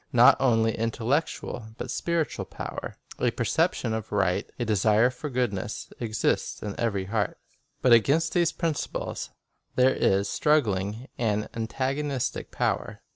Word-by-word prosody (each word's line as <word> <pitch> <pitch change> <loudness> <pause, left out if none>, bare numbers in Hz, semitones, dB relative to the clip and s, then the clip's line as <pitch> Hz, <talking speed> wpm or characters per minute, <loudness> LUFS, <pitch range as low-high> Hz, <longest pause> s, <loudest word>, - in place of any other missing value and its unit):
Not - - +8
only 115 -4 +3
intellec 115 +7 +1
tual 110 -2 -7
but - - -5
spiritual 170 -2 -1
power, - - -6 0.2
a - - +3
perception' 110 - 0
of 110 -1 -4
right, 100 -1 +1
a 120 - -1
desire 110 +3 +3
for 125 +4 -6
goodness, 120 -7 -2
exists 110 -2 -1
in 105 -1 -3
every 100 -5 0
heart. 100 0 -1 0.5
But 125 - +6
against 140 +9 +4
these 170 -2 +3
principles 165 -3 -3 0.5
there 130 +1 +5
is 100 +1 +2
struggling 110 -5 +1
an 105 -2 0
antagonistic 130 +4 -2
power. - - -2
115 Hz, 130 wpm, -27 LUFS, 105-135 Hz, 0.5 s, Not